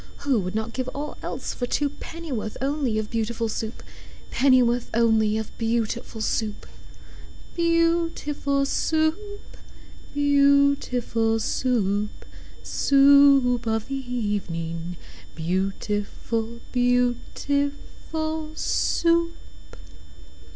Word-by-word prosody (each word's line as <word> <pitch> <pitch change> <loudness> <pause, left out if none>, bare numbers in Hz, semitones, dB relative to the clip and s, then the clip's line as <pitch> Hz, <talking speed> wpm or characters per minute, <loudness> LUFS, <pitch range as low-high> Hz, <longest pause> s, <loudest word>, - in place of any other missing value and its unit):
Who 265 -5 +3
would 185 +1 -4
not 220 +1 -2
give 255 -1 -3
all 295 +1 -4
else - - -4
for 245 - -3
two 290 +3 +1
Pennyworth 290 -10 -6
only 270 -4 0
of 215 -1 -3
Beautiful 230 0 -1
Soup? 220 +1 -5 0.5
Pennyworth 245 -2 +3
only 220 -2 +3
of 220 -1 -5
beautiful 230 0 -2
Soup? 215 -1 -2 0.9
Beau 335 0 +2
ootiful 280 -3 -1
Soo 315 +2 +1
oop! 410 0 -12 0.6
Beau 280 0 +5
ootiful 230 -4 -1
Soo 250 +3 0 0.3
oop! - - -17 0.4
Soo 280 0 +6
oop 245 -1 0
of 225 +1 -1
the - - -3
e 270 - -2
e 230 -4 -1
evening, 165 -1 -5 0.4
Beautiful, 205 +6 -2
beauti 245 +3 +1 0.4
FUL 315 -1 -3
SOUP! 335 +1 +1
245 Hz, 110 wpm, -24 LUFS, 220-285 Hz, 0.9 s, Soo